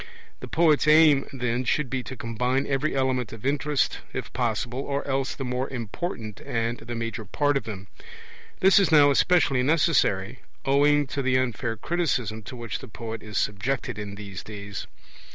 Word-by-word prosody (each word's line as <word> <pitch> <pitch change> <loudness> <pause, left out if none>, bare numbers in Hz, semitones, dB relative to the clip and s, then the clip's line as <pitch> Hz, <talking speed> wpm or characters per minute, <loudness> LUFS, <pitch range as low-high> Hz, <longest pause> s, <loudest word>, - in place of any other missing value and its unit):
The - - -7
poet's 155 -3 +3
aim, 155 -2 +6
then, 125 -2 -1
should 140 +4 +1
be 130 +1 -2
to 130 - -6
combine 125 +4 -1
every 140 +2 0
element 130 -4 0
of 115 +1 -10
interest, 145 0 0
if - - -5
possible, 120 +1 -1
or 140 +1 -3
else 135 -1 -1
the 135 - -4
more 125 +1 -2
important 115 - -5
and 115 +1 -2
the 120 +1 -6
major 115 -1 -4
part 145 +8 0
of 135 - -1
them. 100 -3 -6 0.8
This 190 +1 +7
is 195 -3 +2
now 145 -2 +7
especially 140 -3 +3
necessary 130 - +2 0.3
owing 145 +2 +4
to 140 +1 -3
the 130 -1 +2
unfair 120 -2 -1
criticism 125 -8 -1
to 125 - -8
which 120 -3 -5
the 130 - -10
poet 115 0 -6
is 105 -1 -6
subjected 105 +3 -1
in 100 -1 -6
these 100 -2 -7
days. 100 -1 -7
130 Hz, 170 wpm, -26 LUFS, 115-145 Hz, 0.8 s, This